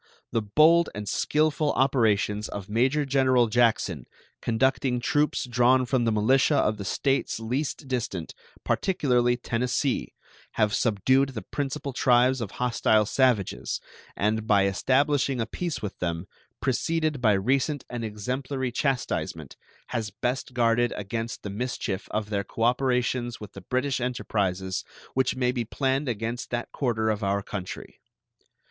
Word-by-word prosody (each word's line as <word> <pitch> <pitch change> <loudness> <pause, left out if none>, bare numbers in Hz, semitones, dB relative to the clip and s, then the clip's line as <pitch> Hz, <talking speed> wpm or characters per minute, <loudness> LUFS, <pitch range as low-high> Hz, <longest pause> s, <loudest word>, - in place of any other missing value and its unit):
The 115 - +1
bold 155 +11 +4
and 105 0 -5
skillful 150 +5 +1
operations 110 -5 +2
of 100 -2 -6
Major 130 +7 +1
General 130 -2 +3
Jackson, 110 - +1 0.3
conducting 125 +1 +1
troops 145 +5 +1
drawn 125 +1 +3
from 125 -1 +1
the 115 - +2
militia 130 +7 +3
of 110 -6 +2
the 100 - -5
States 135 +4 0
least 135 +5 -3
distant, 110 -10 -3 0.3
particularly 125 -9 +1
Tennessee, 125 +3 -1 0.4
have 105 -1 +1
subdued 130 +6 +2
the 110 - -4
principal 140 0 -4
tribes 125 0 +3
of 110 - -3
hostile 115 -3 +2
savages, 120 -4 +1 0.4
and, 110 +1 0
by 100 -3 +4
establishing 135 +6 +1
a 115 - 0
peace 170 -1 -4
with 105 - -5
them, 85 0 -2 0.4
preceded 150 +3 0
by 110 -4 +4
recent 135 +8 0
and 120 -1 -5
exemplary 125 +5 -3
chastisement, 135 +1 -2 0.3
has 110 -3 -2
best 125 +5 -3
guarded 120 0 +3
against 115 +3 -4
the 105 - -5
mischief 110 -3 -3
of 105 0 -3
their 100 -1 0
cooperations 125 +1 0
with 105 -2 -10
the 95 - -9
British 130 +6 -1
enterprises 95 -7 -1 0.3
which 130 0 +1
may 125 -1 +1
be 125 -2 -2
planned 135 +4 -1
against 115 +2 -3
that 120 -1 -3
quarter 110 -5 0
of 105 0 -3
our 100 0 0
country. 95 -2 -7
120 Hz, 140 wpm, -26 LUFS, 110-130 Hz, 0.4 s, bold